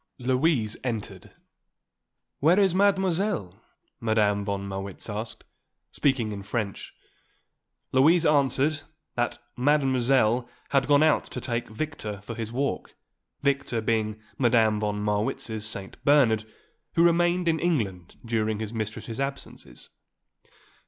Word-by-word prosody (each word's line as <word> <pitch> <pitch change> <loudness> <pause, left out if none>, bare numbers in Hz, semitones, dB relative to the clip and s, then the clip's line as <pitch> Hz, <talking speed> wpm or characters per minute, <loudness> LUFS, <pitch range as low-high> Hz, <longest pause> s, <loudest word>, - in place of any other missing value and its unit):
Louise 125 -3 +1
entered. 115 -5 -5 1.0
"Where 165 +7 +4
is 195 -3 +4
Mademoiselle?" 190 - +1 0.4
Madame 105 -2 +2
von 100 -1 -3
Marwitz 95 0 -6
asked, 110 +1 -5 0.5
speaking 130 -6 +1
in 100 -1 -5
French. 105 0 -4 1.0
Louise 160 +6 +5
answered 145 +1 +2 0.3
that 120 0 -1 0.2
Mademoiselle 130 -3 +2 0.2
had 135 -1 +2
gone 145 +1 +5
out 155 -2 +3
to - - -5
take 120 -2 -3
Victor 110 -4 -5
for 110 +3 -7
his 115 -1 -5
walk, 140 +3 -2 0.5
Victor 140 -4 0
being 110 -1 -1 0.2
Madame 110 -4 +3
von 105 -1 -2
Marwitz's 105 +1 -1
St. 100 -3 -5
Bernard 115 -7 +3 0.4
who 170 - +5
remained 175 +1 +3
in 160 -1 +2
England 100 - -1
during 110 -2 0
his 110 +1 -5
mistress's 110 +1 -5
absences. 140 0 -6
120 Hz, 115 wpm, -26 LUFS, 110-145 Hz, 1.0 s, Louise